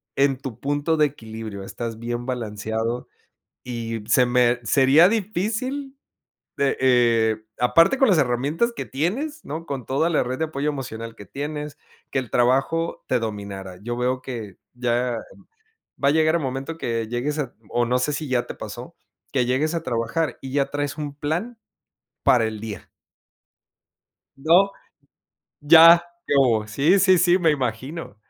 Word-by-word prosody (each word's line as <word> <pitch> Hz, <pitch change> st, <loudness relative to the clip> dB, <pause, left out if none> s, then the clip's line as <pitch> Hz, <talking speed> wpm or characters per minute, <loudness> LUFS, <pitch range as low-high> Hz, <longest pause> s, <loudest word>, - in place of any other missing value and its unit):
en 135 Hz, -1 st, +2 dB
tu 130 Hz, -4 st, -8 dB
punto 145 Hz, +4 st, 0 dB
de 155 Hz, -1 st, +4 dB
equilibrio, 110 Hz, -6 st, -8 dB
estás 115 Hz, +3 st, -6 dB
bien 120 Hz, +1 st, -4 dB
balanceado 115 Hz, -1 st, -3 dB, 0.6 s
y 115 Hz, -3 st, -4 dB
se 125 Hz, +2 st, +4 dB
me 125 Hz, 0 st, +3 dB
sería 135 Hz, -, +5 dB
difícil 225 Hz, +7 st, -2 dB, 0.6 s
de, 140 Hz, -1 st, +1 dB
eh, 115 Hz, -4 st, +3 dB, 0.2 s
aparte 165 Hz, -, +4 dB
con 270 Hz, -, +4 dB
las 185 Hz, -, +4 dB
herramientas 140 Hz, -, +1 dB
que -, -, -4 dB
tienes, 255 Hz, -, -3 dB
¿no? 160 Hz, +3 st, -6 dB
Con 135 Hz, -6 st, -5 dB
toda 140 Hz, +5 st, +1 dB
la 165 Hz, -, +2 dB
red 125 Hz, +1 st, -4 dB
de 160 Hz, -, +1 dB
apoyo 150 Hz, -1 st, -2 dB
emocional 115 Hz, -5 st, -6 dB
que 100 Hz, -, -11 dB
tienes, 150 Hz, +5 st, -5 dB, 0.3 s
que 135 Hz, -, +1 dB
el 125 Hz, -4 st, -6 dB
trabajo 135 Hz, +7 st, +1 dB
te 125 Hz, -, +1 dB
dominara. 100 Hz, -4 st, -6 dB
Yo 120 Hz, +3 st, -4 dB
veo 125 Hz, +1 st, 0 dB
que 115 Hz, -7 st, -7 dB, 0.2 s
ya 120 Hz, 0 st, 0 dB, 0.9 s
va 140 Hz, -, +4 dB
a -, -, +5 dB
llegar 160 Hz, +1 st, +3 dB
el -, -, -1 dB
momento 135 Hz, +3 st, -4 dB
que 115 Hz, -5 st, -2 dB
llegues 130 Hz, +6 st, -2 dB
a 135 Hz, -5 st, -3 dB
o 120 Hz, -, +1 dB
no 125 Hz, +2 st, +1 dB
sé 125 Hz, +4 st, 0 dB
si 150 Hz, +1 st, -4 dB
ya 125 Hz, -2 st, 0 dB
te -, -, -7 dB
pasó, -, -, -8 dB, 0.4 s
que 130 Hz, -3 st, +2 dB
llegues 135 Hz, +7 st, 0 dB
a 165 Hz, -, -2 dB
trabajar 120 Hz, +5 st, -2 dB
y 135 Hz, -1 st, -8 dB
ya 140 Hz, -1 st, +1 dB
traes 145 Hz, 0 st, -3 dB
un 145 Hz, -2 st, -5 dB
plan 170 Hz, +12 st, -3 dB, 0.7 s
para 120 Hz, -2 st, +5 dB
el 110 Hz, -1 st, -5 dB
día. 110 Hz, -3 st, -7 dB, 1.5 s
No. 170 Hz, +8 st, +4 dB, 0.9 s
Ya, 165 Hz, +3 st, +8 dB, 0.2 s
¿qué -, -, 0 dB
hubo? 115 Hz, -6 st, +3 dB
Sí, 145 Hz, -, +3 dB
sí, 185 Hz, -1 st, +5 dB
sí, 180 Hz, +1 st, +4 dB
me 165 Hz, -3 st, +3 dB
imagino. 130 Hz, 0 st, -3 dB
135 Hz, 160 wpm, -23 LUFS, 120-160 Hz, 1.5 s, Ya